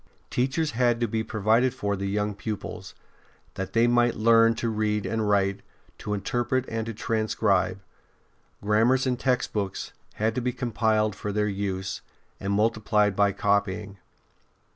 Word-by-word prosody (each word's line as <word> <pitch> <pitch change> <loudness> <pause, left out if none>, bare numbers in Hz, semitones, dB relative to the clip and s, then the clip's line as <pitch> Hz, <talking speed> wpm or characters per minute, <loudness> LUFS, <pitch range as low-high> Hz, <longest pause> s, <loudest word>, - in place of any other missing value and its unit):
Teachers 135 +5 0
had 120 -1 +2
to 120 - +1
be 110 +1 -1
provided 110 +4 +1
for 100 -5 -1
the 100 0 -3
young 105 +1 -1
pupils, 105 +1 -6 0.6
that 95 - -5
they 115 +1 +4
might 120 0 +3
learn 115 +1 +5
to 115 - -2
read 105 -2 0
and 110 -2 -1
write, 100 -1 +1 0.4
to 105 - -3
interpret 120 +5 -1
and 115 0 -3
to 115 - -4
transcribe. 105 -4 0 0.8
Grammars 115 +6 +3
and 125 -1 0
textbooks 115 -7 -1 0.2
had 110 +1 0
to 125 - -2
be 125 +1 -1
compiled 110 -4 0
for 105 - -4
their 105 +1 0
use, 95 -1 -3 0.4
and 100 - -3
multiplied 105 -1 +2
by 100 0 +3
copying. 100 0 -1
110 Hz, 145 wpm, -26 LUFS, 100-115 Hz, 0.8 s, learn